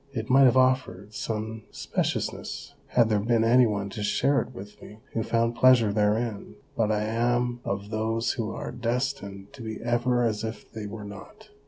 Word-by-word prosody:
It 110 -1 -3
might 135 +1 +7
have 130 0 +5
offered 130 -6 +1
some 110 0 -4
speciousness, - - -3
had 120 -2 +3
there 105 -2 +2
been 115 +2 +2
any 120 +2 +5
one 100 -2 -2
to 105 - -5
share 135 +7 +2
it - - -8
with 105 -4 -11
me 105 - -12 0.2
who 115 - 0
found 115 +1 +1
pleasure 120 -5 +5
therein, 105 +1 0 0.2
but 110 -2 +1
I 105 0 +1
am 120 +2 0
of 100 +1 -4
those 110 +1 0
who 110 -2 -3
are - - -5
destined 120 -4 -3
to 135 - -11
be 110 -1 -5
ever 120 +1 +1
as 110 -2 0
if 110 0 -6
they 110 -2 -6
were 105 0 -7
not. 100 0 -12
115 Hz, 185 wpm, -27 LUFS, 105-120 Hz, 0.2 s, might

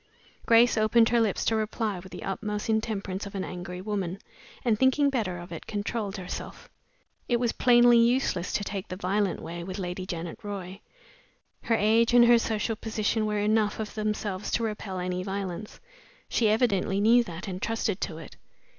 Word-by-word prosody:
Grace 235 0 +5
opened 225 +1 +4
her 235 0 +3
lips 215 -4 0
to 225 - +2
reply 215 -2 -2
with 185 +1 -12
the - - -8
utmost 210 +2 -3
intemperance 205 -3 -2
of 200 - -10
an 190 - -2
angry 180 0 -6
woman, 195 -3 -3 0.5
and 220 -3 +2
thinking 275 +2 +3
better 210 -9 -1
of 175 +1 -10
it, 165 - -8
controlled 205 0 -3
herself. 180 -1 -7 0.6
It 240 -1 +2
was 240 -1 +1
plainly 240 -1 +5
useless 230 -7 +2
to 205 - 0
take 200 0 -5
the 185 - -5
violent 195 +1 -1
way 170 +1 -6
with 185 +2 -6
Lady 185 0 -4
Janet 170 -2 -5
Roy. 200 -2 -6 0.8
Her 230 - +1
age 225 +3 +3
and 240 -1 +8
her 235 0 +6
social 225 0 -1
position 215 0 -1
were 210 0 -1
enough 210 +1 +1
of 215 -1 -4
themselves 210 -2 -2
to 235 - +1
repel 210 -3 -4
any 180 0 -2
violence. 195 +1 -5 0.5
She 225 -3 +2
evidently 205 -4 +2
knew 235 +4 +5
that, 175 +1 -7
and 185 -1 -5
trusted 225 -3 -1
to 160 - -3
it. 165 - -11
210 Hz, 180 wpm, -27 LUFS, 185-225 Hz, 0.8 s, and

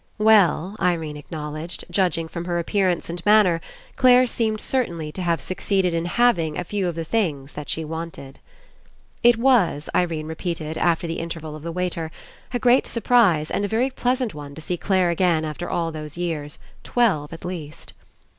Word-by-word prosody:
Well, 210 -3 +4
Irene 165 -4 0
acknowledged, 155 +2 -6
judging 175 -4 +1
from 170 +1 -6
her 175 -1 -1
appearance 180 +1 0
and 170 +1 -5
manner, 205 -5 +5 0.4
Clare 255 0 +6
seemed 220 -3 -1
certainly 170 -14 -1
to 185 - -6
have 170 -2 +1
succeeded 185 -1 0
In 165 0 -1
having 175 -6 +2
a 180 - -2
few 195 +1 -2
of 175 - -3
the 165 - -3
things 155 -8 -1
that 150 -1 -7
she 160 - -2
wanted. 160 -4 -7 0.8
It 240 -1 +6
was, 230 - +2
Irene 165 -3 0
repeated, 160 -1 -4
after 170 0 +1
the 165 0 -3
Inter 165 -1 -5
val 155 -1 -7
of 155 - -9
the 170 +2 -5
waiter, 175 -2 -2 0.4
a 245 - 0
great 245 +2 +4
surprise 220 -10 +3
and - - 0
a - - +1
very 235 +6 +1
pleasant 250 -2 0
one 145 -1 -9
to 160 - -9
see 175 +3 -2
Clare 185 -1 +1
again 170 -2 +2
after 155 +3 -5
all 165 -1 -1
those 155 0 -7
years, 160 -4 -3 0.3
twelve 195 -12 +1
at 165 +1 -9
least. 160 -4 -7
170 Hz, 180 wpm, -23 LUFS, 160-205 Hz, 0.8 s, Clare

